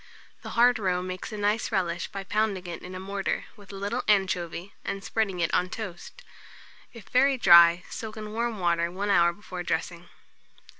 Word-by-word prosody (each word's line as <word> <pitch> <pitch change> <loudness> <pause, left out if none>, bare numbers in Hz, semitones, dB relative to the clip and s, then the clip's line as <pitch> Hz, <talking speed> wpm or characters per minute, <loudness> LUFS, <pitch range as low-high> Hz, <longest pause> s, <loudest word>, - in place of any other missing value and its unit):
The - - -8
hard 245 0 +5
roe 180 -3 0
makes 185 +2 -6
a 215 - -5
nice 210 +2 0
relish 175 -2 -1
by 195 - -7
pounding 205 -2 -1
it 170 -1 -6
in 185 +1 -9
a - - -5
mortar, 195 +1 -3
with 205 -1 -14
a - - -9
little 205 +6 -2
anchovy, 185 -2 0
and 195 0 -4
spreading 200 -5 -1
it 165 - 0
on 180 - +2
toast. 215 - -8 0.7
If 230 -3 -13
very 270 +2 +3
dry, 170 -4 +7
soak 220 -1 -6
in 215 -1 -6
warm 230 0 -2
water 170 -2 +1
1 195 +4 -3
hour 170 -3 +5
before 180 -1 -8
dressing. 170 0 -3
195 Hz, 185 wpm, -27 LUFS, 175-215 Hz, 0.7 s, dry